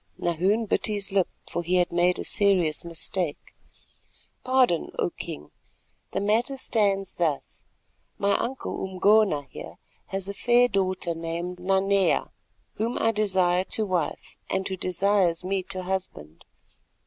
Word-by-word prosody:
Nahoon 185 +7 +1
bit 210 - +1
his 205 -2 -2
lip, 195 -2 +2 0.2
for 175 - -3
he 175 +2 0
had 180 -1 +2
made 175 +1 +2
a - - -4
serious 185 -7 +3
mistake. 170 -1 -3 0.9
"Pardon, 255 -9 +2
O - - 0
King. 75 +1 -8 0.6
The 190 - -1
matter 225 +7 +1
stands 200 -6 +1
thus: 155 -5 -2 0.6
My 200 - +1
uncle 260 +3 -4
Umgona 190 -4 +3
here - - -9 0.3
has 195 0 -1
a 200 - -4
fair 240 +4 +4
daughter 185 -5 -1
named 170 +2 -5
Nanea, 195 +1 +2 0.5
whom 230 +3 -1
I 225 - +2
desire 190 -4 +2
to 220 - +1
wife, 180 -5 -3
and 190 0 -1
who 190 - -3
desires 185 -1 +1
me 195 0 0
to 185 -1 -4
husband. 180 - -5
190 Hz, 135 wpm, -26 LUFS, 175-205 Hz, 0.9 s, fair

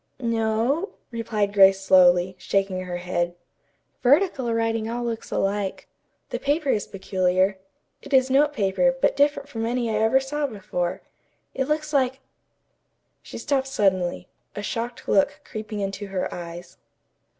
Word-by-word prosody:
"No," 230 - 0 0.2
replied 215 -3 -1
Grace 195 -1 +6
slowly, 185 -1 +5
shaking 195 -2 -1
her 175 -1 -4
head. 175 -1 -2 0.7
"Vertical 275 -2 +3
writing 225 -1 0
all 240 +1 -3
looks 230 -2 -4
alike. 195 0 -2 0.4
The - - -2
paper 290 +1 0
is 210 - +1
peculiar. 190 0 0 0.4
It - - -12
is 260 -1 +5
note 290 +2 +4
paper, 265 +2 +1
but - - +2
different 285 0 +2
from 225 -6 -5
any 235 0 -1
I 215 0 0
ever 225 +4 +4
saw 290 +2 -2
before. 185 -6 -4 0.5
It 265 0 -1
looks 300 0 -1
like 265 -1 +1 0.5
" - - -48
She - - -9
stopped 270 -2 0
suddenly, 185 -8 0 0.3
a 205 - -5
shocked 235 +3 -4
look 195 - +2
creeping 215 -1 -6
into 195 +1 -4
her 190 -1 -3
eyes. 175 0 -9
220 Hz, 145 wpm, -24 LUFS, 190-265 Hz, 0.7 s, Grace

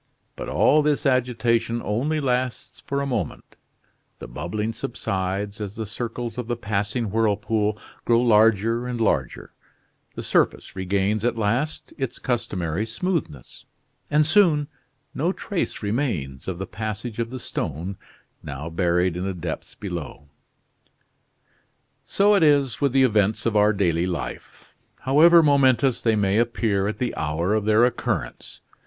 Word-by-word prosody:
But - - -6
all 155 - +4
this 150 -1 0
agitation 120 -3 +1
only 140 +9 0
lasts 130 -2 -2
for 140 0 -1
a - - -1
moment; 125 -6 -4 0.6
the - - -9
bubbling 105 - -3
subsides 100 -2 -3
as 100 0 -5
the 110 - -4
circles 115 +2 -5
of 120 - -4
the 120 - -1
passing 105 0 -2
whirlpool 105 -1 +1 0.3
grow 115 -1 +3
larger 115 0 +3
and 125 -1 -4
larger; 110 - -1 0.6
the - - -5
surface - - 0
regains 100 +3 0
at 120 -1 0
last 120 +8 -1
its 130 -3 -3
customary 95 -7 -2
smoothness; 115 - -4 0.4
and 150 +1 +3
soon 160 -4 +4 0.5
no 165 +6 0
trace 190 - -4
remains 100 - -2
of 95 -2 -3
the 95 - -4
passage 110 +2 -5
of 115 -1 -1
the 130 - -6
stone, 85 - -4 0.5
now 70 +4 -6
buried 90 0 +1
in 90 - -3
the 95 -1 -3
depths 85 -2 -6
below. 85 -7 -7 1.8
So 205 +1 +3
it 200 - +4
is 145 -5 +3
with 140 -2 +2
the 135 +1 +4
events 105 -4 +2
of 115 -2 0
our 105 0 +5
daily 90 -4 +1
life, 90 -2 -6 0.3
however 165 +5 +6
momentous 135 -3 +3
they 115 -2 +2
may 100 0 +2
appear 110 -4 0
at 105 0 -3
the 125 +1 -2
hour 85 +6 -1
of 110 -1 0
their 110 +2 +5
occurrence. 125 - -3
110 Hz, 145 wpm, -24 LUFS, 100-125 Hz, 1.8 s, however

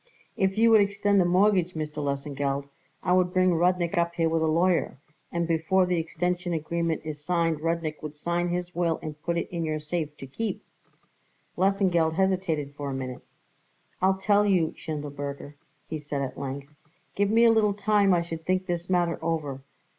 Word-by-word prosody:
"If 190 +1 0
you 230 +1 +5
would 220 -2 +7
extend 200 0 +2
the - - +3
mortgage, 185 -1 +3
Mr. 155 -1 -4
Lesengeld, 140 0 -2 0.4
I 180 - +2
would 180 -1 +3
bring 185 -1 +3
Rudnik 175 +1 +2
up 170 0 0
here 165 -1 +2
with 165 0 +1
a 160 - +2
lawyer, 170 +1 +2 0.3
and 170 -1 -1
before 165 +3 +2
the 180 -1 0
extension 175 +2 -2
agreement 165 0 -1
is 150 -1 -6
signed 165 -2 +1
Rudnik 165 -1 -2
would 150 -1 -7
sign 175 +3 -1
his 180 0 -3
will 170 -2 +1
and 150 -1 -7
put 170 +1 -1
it 170 - -1
in 170 -2 -2
your 155 -1 -1
safe 150 -1 -4
to - - -8
keep." 210 - -4 0.9
Lesengeld 185 -4 +2
hesitated 180 -6 0
for 145 -1 -5
a 135 - -3
minute. 130 -1 -5 0.8
"I'll 190 +1 +3
tell 205 +2 +3
you, 180 -6 +2
Schindelberger," 145 -2 -6 0.3
he 155 0 -4
said 145 -1 -3
at 135 - -5
length; 140 +1 -6 0.4
"give 205 0 +1
me 230 +2 +5
a 230 - +7
little 210 -3 +3
time 205 -1 +3
I 175 -2 +3
should 165 -1 -6
think 185 +2 0
this 175 -1 -3
matter 175 -2 +1
over. 150 -5 -2
170 Hz, 185 wpm, -27 LUFS, 155-185 Hz, 0.9 s, would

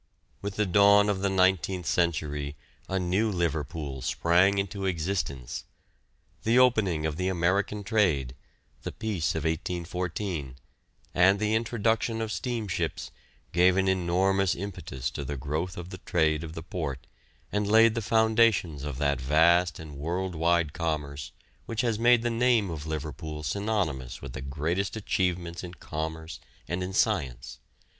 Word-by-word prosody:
With 100 -1 -4
the 105 - +1
dawn 100 +2 +5
of 100 -2 0
the 100 - +1
nineteenth 95 -1 +2
century 75 -3 0 0.3
a 95 - 0
new 95 +5 +1
Liverpool 80 -6 -2
sprang 85 +9 +3
into 100 0 -2
existence. 80 -8 -3 0.8
The 115 +2 +2
opening 105 -11 +3
of 80 -1 -2
the 90 +1 -1
American 95 +3 0
trade, 90 - +1 0.5
the - - -5
peace 105 -10 -2
of 80 - -2
1814, 85 -2 -3 0.6
and 95 +3 +5
the 110 0 +1
introduction 115 0 0
of 110 -1 -2
steamships, 105 0 -3 0.4
gave 90 +2 +4
an 95 0 +2
enormous 95 +1 +2
impetus 70 -9 -5
to 70 - -5
the 70 +1 -4
growth 75 +7 -3
of 90 +1 -7
the 95 - -8
trade 80 -3 +1
of 80 -1 -7
the 80 - -7
port 75 -8 -4 0.5
and 105 0 0
laid 110 +1 +6
the 115 - -2
foundations 110 -9 +3
of 75 -3 -4
that 70 -2 0
vast 80 +5 +4
and 80 -2 -9
world 90 +6 -2
wide 85 -1 +1
commerce 75 -5 -3 0.4
which 115 -1 -1
has 115 -3 0
made 120 0 +5
the 120 - 0
name 115 -5 +2
of 80 -1 -6
Liverpool 75 0 -5
synonymous 80 - -2
with - - -8
the 65 - -6
greatest 80 +9 -2
achievements 90 -5 -1
in 90 0 -8
commerce 80 -2 -5 0.3
and 85 +3 -2
in 90 +1 -3
science. 65 - -1
90 Hz, 150 wpm, -28 LUFS, 75-100 Hz, 0.8 s, laid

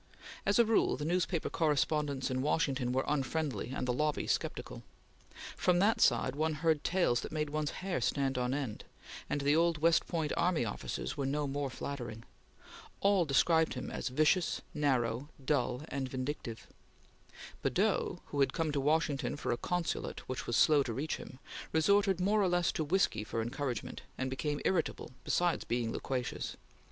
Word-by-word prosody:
As 200 - +4
a 235 - +6
rule, 220 -9 +2
the 145 - -4
newspaper 175 0 0
correspondents 150 -3 +1
in 130 0 0
Washington 140 -4 +1
were 130 +1 0
unfriendly, 145 -5 -1
and 130 - -3
the 125 - +1
lobby 150 +3 0
sceptical. - - -2 0.7
From 180 -1 +2
that 205 +5 +3
side 125 +2 +3
one 155 +1 0
heard 155 -1 +1
tales 175 -10 +2
that - - -6
made 150 -2 -2
one's 155 -1 -1 0.2
hair 185 -9 -1
stand 135 +2 0
on 125 0 0
end, 135 -6 -3 0.5
and 145 - -1
the 145 +2 +3
old 165 0 +3
West 165 +2 +3
Point 160 -4 -1
army 170 -8 +2
officers 65 - -4
were 135 - -1
no 145 +2 0
more 140 0 -2
flattering. 120 -4 -6 0.8
All 200 -3 +3
described 160 +3 +3
him 125 - -5
as - - -3
vicious, 155 +6 +2
narrow, 130 -2 0 0.2
dull, 125 -2 0
and 135 -2 -3
vindictive. 130 -3 -4 1.0
Badeau, - - +1
who 145 - -3
had 135 - +3
come 165 -3 0
to 145 -1 0
Washington 150 -1 +1
for 145 - -2
a - - +2
consulate 175 +3 -3
which 130 - -4
was 120 - +1
slow 150 -2 +6
to 120 -4 -2
reach 145 +6 -2
him, 130 - -10 0.3
resorted 195 +3 +3
more 205 +3 +3
or 195 - +3
less 175 -1 +2
to 160 - -1
whiskey 150 - +1
for 115 +1 -4
encouragement, 120 +1 -3 0.2
and 130 0 -2
became 145 +2 -2
irritable, 170 -8 0
besides 175 -1 +1
being 120 -1 -1
loquacious. 130 -2 -3
145 Hz, 170 wpm, -33 LUFS, 130-165 Hz, 1.0 s, a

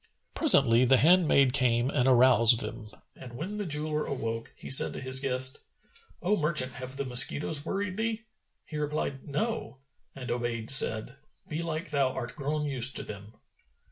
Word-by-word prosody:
Presently, 130 - +3
the 130 +1 +3
handmaid 150 -4 +3
came 125 -1 0
and 130 -3 0
aroused 120 -2 +5
them; 105 -2 -8 0.3
and 125 -2 -13
when 175 +12 -7
the 205 -3 -5
jeweller 150 0 -2
awoke, 115 -4 -6
he - - -13
said 135 - +5
to - - -7
his 130 0 -1
guest, 130 -1 0 0.6
"O 195 +4 +1
merchant 150 -7 +1
have 130 +1 -9
the 140 - -3
mosquitoes 145 +4 +3
worried 195 -1 -4
thee?" 225 0 -3 0.4
He 155 - -8
replied, 150 -2 -5
"No," 150 - -4 0.4
and 130 -2 -7
Obayd 120 -1 -3
said, 125 -1 +1 0.3
"Belike 160 0 -5
thou 140 -3 0
art 120 -3 -7
grown 150 +1 -4
used 130 -3 +4
to - - 0
them." 105 +1 -11
135 Hz, 160 wpm, -27 LUFS, 125-155 Hz, 0.6 s, aroused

